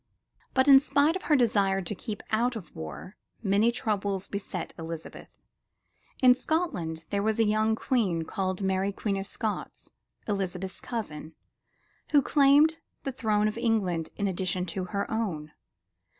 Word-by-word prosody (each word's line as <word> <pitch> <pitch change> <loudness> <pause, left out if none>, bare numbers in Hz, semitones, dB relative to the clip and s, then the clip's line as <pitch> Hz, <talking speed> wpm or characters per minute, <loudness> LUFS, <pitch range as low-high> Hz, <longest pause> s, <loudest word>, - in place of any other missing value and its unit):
But 260 +1 +4
in 275 -1 +10
spite 285 +3 +2
of 375 - -3
her 300 - +6
desire 200 -6 +3
to 195 +3 -4
keep 210 +1 -6
out 235 +3 +1
of 180 -9 -9
war, 80 - -8 0.3
many 205 +3 +3
troubles 205 -5 -1
beset 200 0 -5
Elizabeth. 165 0 -7 0.9
In 250 -1 +9
Scotland 180 - -2
there 200 -1 +1
was 220 +1 +1
a 225 - +4
young 215 +1 +2
queen 205 -10 0
called 185 +3 -3
Mary 190 +1 +1
Queen 200 0 -2
of 195 0 -4
Scots, 215 -1 -5 0.4
Elizabeth's 190 -2 -3
cousin, 160 -10 -5 0.8
who 285 -2 +6
claimed 295 +4 +5 0.2
the 270 - -2
throne 215 -4 +1
of 215 +2 -3
England 190 -9 0
in 205 - 0
addition 185 -1 -1
to 185 +1 -3
her 200 +2 -2
own. 175 -10 -2
205 Hz, 150 wpm, -28 LUFS, 185-235 Hz, 0.9 s, in